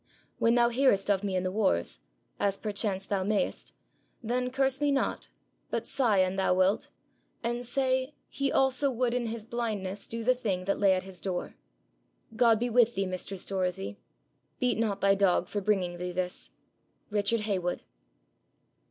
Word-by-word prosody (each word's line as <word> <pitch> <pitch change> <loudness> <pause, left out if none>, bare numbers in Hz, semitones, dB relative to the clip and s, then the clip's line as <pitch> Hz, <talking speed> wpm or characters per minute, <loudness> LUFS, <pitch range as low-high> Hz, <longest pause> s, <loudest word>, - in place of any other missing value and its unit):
When 230 +1 +4
thou 240 -1 +4
hearest 235 -5 +3
of 195 0 +1
me 195 -2 -1
in 185 - 0
the 185 - -1
Wars, 190 - +1 0.4
as 200 -1 +1
perchance 205 -2 -2
thou 195 -2 -1
mayest, 205 +1 -1 0.5
then 250 +2 0
curse 270 +1 +1
me 290 -1 +3
not, 275 - -1 0.4
but - - -2
sigh 235 -7 +2
an 185 0 +2
thou 190 -1 +2
wilt, 185 +2 +2 0.5
and 240 +1 -1
say, 260 +2 0
he 275 -1 -1
also 265 +1 +3
would 245 -1 0
in 245 -1 -1
his 225 -1 -4
Blindness 210 -5 -3
do 230 0 -4
the 255 +3 +4
Thing 200 -7 -2
that 200 - 0
lay 195 -2 +5
at 185 - -2
his 190 -1 -12
Door. 180 -2 -3 0.8
God 225 -1 +4
be 240 - 0
with 240 0 +3
thee, 195 - 0
mistress 185 +1 -4
Dorothy. 180 - -2 0.6
Beat 250 -3 +1
not 215 -3 0
thy 195 0 +5
Dog 190 -3 +2
for 205 - -3
bringing 185 -4 0
thee 180 0 -3
this. 180 0 -3 0.6
'RICHARD 210 +2 +1
HEYWOOD.' 185 -4 -1
205 Hz, 170 wpm, -29 LUFS, 190-240 Hz, 0.8 s, lay